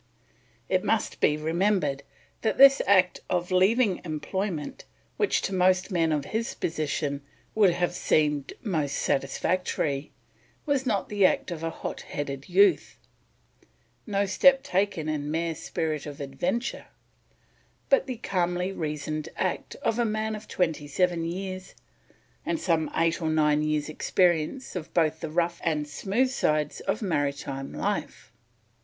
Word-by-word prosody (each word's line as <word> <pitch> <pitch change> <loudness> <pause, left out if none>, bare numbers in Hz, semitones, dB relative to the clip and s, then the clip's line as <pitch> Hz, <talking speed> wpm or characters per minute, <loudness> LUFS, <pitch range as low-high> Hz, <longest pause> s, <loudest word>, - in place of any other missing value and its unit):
It - - +1
must - - 0
be 150 - +3
remembered 160 -2 +1 0.4
that 220 - 0
this 275 0 +8
act 185 -2 +4
of 180 0 -1
leaving 195 +2 +3
employment 165 +1 -4 0.3
which, 420 - +1
to 195 - -2
most 185 +1 +2
men 165 -3 +2
of 150 -2 0
his 225 +6 -3
position, 145 -2 -2 0.3
would 210 -3 +5
have 175 0 0
seemed 150 -4 +1
most 155 - -1
satisfactory, 140 0 -1 0.5
was 280 -3 0
not 205 -5 0
the 205 -1 +1
act - - -1
of 165 -2 -5
hot 165 0 -4
headed 140 -1 -5
youth, 400 -2 +3 1.1
no 200 -1 +1
step 270 +8 +5
taken 190 - 0
in 150 -1 -2
mere 165 +1 -1
spirit 155 -1 -3
of 145 -1 -8
adventure, 145 - -3 1.0
but 275 0 +3
the 255 -2 -4
calmly 180 -3 -1
reasoned 155 -2 -4
act - - -2
of 225 +1 +1
a - - +4
man 215 0 -1
of 215 0 -9
twenty 160 -5 -1
seven 175 +2 +1
years 185 +2 -5 0.7
and 330 -1 -1
some 165 - +1
eight 165 +1 +1
or 160 - 0
nine 150 -1 +3
years 150 -1 0
experience 175 - 0
of 170 -3 -5
both 160 -2 +2
the 160 - -4
rough 170 +1 0
and 150 -3 0
smooth 215 - 0
sides 150 - 0
of 200 +3 -2
maritime 140 -5 -2
life. - - -3
170 Hz, 140 wpm, -27 LUFS, 150-200 Hz, 1.1 s, this